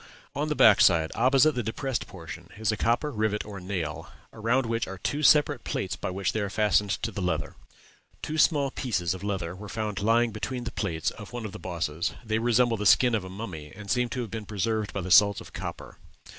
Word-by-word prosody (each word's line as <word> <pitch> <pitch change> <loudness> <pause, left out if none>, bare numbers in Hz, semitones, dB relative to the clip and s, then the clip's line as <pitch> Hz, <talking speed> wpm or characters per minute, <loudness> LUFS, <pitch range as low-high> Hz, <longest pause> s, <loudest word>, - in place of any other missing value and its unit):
On 145 +2 -1
the 150 - 0
back 110 -5 +6
side, 85 -5 +4
opposite 135 +5 +4
the 125 - -1
depressed 120 +2 -3
portion, 90 -1 -10
is 110 0 0
a - - -1
copper 120 +7 0
rivet 105 -2 -1
or 100 -2 -8
nail, 90 -5 -4 0.2
around 120 +4 +1
which 115 0 -1
are 95 - -7
two 145 - -2
separate 145 -3 +4
plates 95 -3 -3
by 80 - -4
which 95 +1 -1
they 110 - -2
were 100 - -2
fastened 105 -1 +2
to 115 - -1
the 100 - -5
leather. 80 -5 -2 0.7
Two 155 +1 -3
small 145 -4 +3
pieces 95 - -1
of 95 0 -8
leather 95 -4 -3
were 105 +2 -9
found 105 -2 -3
lying 115 +2 +3
between 120 +4 -4
the 120 - -4
plates 80 -7 -2
of - - -11
one 120 -2 -5
of 105 - -5
the 105 - -9
bosses; 85 -2 -3
they 110 0 0
resemble 120 0 +2
the 105 - -3
skin 125 +4 +5
of 110 -4 0
a 95 - -8
mummy, 90 -7 -7
and 100 0 -6
seem 125 -1 +1
to 125 +2 -3
have 115 -5 -6
been 110 -1 -6
preserved 110 +1 -1
by 100 - -3
the 90 +1 -5
salts 100 +1 +6
of - - -12
copper. - - -7
105 Hz, 225 wpm, -27 LUFS, 95-120 Hz, 0.7 s, back